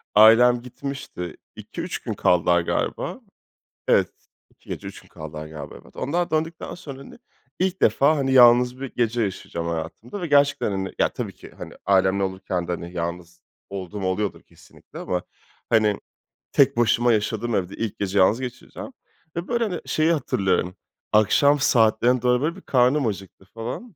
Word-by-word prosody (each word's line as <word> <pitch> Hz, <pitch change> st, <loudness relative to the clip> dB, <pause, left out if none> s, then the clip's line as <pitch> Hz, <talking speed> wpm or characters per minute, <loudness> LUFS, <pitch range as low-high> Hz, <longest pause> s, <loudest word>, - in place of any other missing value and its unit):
Ailem 120 Hz, +3 st, +7 dB
gitmişti. 125 Hz, -, -7 dB, 0.2 s
2-3 -, -, -6 dB
gün -, -, -4 dB
kaldılar, 85 Hz, 0 st, +3 dB
galiba. -, -, -2 dB, 0.7 s
Evet, -, -, +4 dB, 0.4 s
2 -, -, -27 dB
gece -, -, -5 dB
3 -, -, -10 dB
gün -, -, -21 dB
kaldılar 75 Hz, 0 st, -8 dB
galiba, 75 Hz, -1 st, -9 dB
evet. -, -, -20 dB
Onlar 170 Hz, +5 st, -1 dB
döndükten 160 Hz, +1 st, -2 dB
sonra, 140 Hz, -5 st, -9 dB
hani, 140 Hz, -, -13 dB, 0.4 s
ilk 190 Hz, +1 st, -1 dB
defa, 150 Hz, +3 st, +4 dB
hani, 135 Hz, -2 st, 0 dB
yalnız 125 Hz, 0 st, +6 dB
bir 135 Hz, -, -6 dB
gece 120 Hz, 0 st, +1 dB
yaşayacağım 85 Hz, -4 st, -4 dB
hayatımda 85 Hz, -, -5 dB
ve 175 Hz, -, -2 dB
gerçekten, 140 Hz, -6 st, +3 dB
hani, 95 Hz, -1 st, -3 dB
ya, -, -, +3 dB
tabii -, -, -5 dB
ki, -, -, -13 dB
hani, -, -, -8 dB
ailemle 95 Hz, 0 st, +3 dB
olurken 95 Hz, -2 st, -3 dB
de, -, -, -1 dB
hani, 85 Hz, 0 st, -6 dB
yalnız 85 Hz, 0 st, -5 dB, 0.3 s
olduğum 100 Hz, +1 st, -6 dB
oluyordur 95 Hz, +2 st, -2 dB
kesinlikle -, -, -16 dB
ama, 90 Hz, -1 st, -2 dB, 0.5 s
hani, 110 Hz, -3 st, +3 dB, 0.5 s
tek -, -, +4 dB
başıma 120 Hz, 0 st, +3 dB
yaşadığım 110 Hz, +1 st, -1 dB
evde 95 Hz, 0 st, -2 dB
ilk 115 Hz, -2 st, -4 dB
gece 100 Hz, 0 st, 0 dB
yalnız 105 Hz, +6 st, +4 dB
geçireceğim 130 Hz, -, -8 dB, 0.4 s
ve, 170 Hz, +1 st, -4 dB
böyle, 235 Hz, -1 st, 0 dB
hani, 185 Hz, -6 st, -3 dB
şeyi 155 Hz, +2 st, +2 dB
hatırlıyorum, 95 Hz, -, 0 dB, 0.4 s
akşam 140 Hz, +7 st, +4 dB
saatlerine 120 Hz, 0 st, +3 dB
doğru, 125 Hz, 0 st, +2 dB
böyle, 165 Hz, +4 st, -1 dB
bir 195 Hz, -, -12 dB
karnım 130 Hz, +1 st, +2 dB
acıktı 95 Hz, -2 st, -6 dB
falan. 125 Hz, -, -7 dB
115 Hz, 160 wpm, -23 LUFS, 95-135 Hz, 0.7 s, Ailem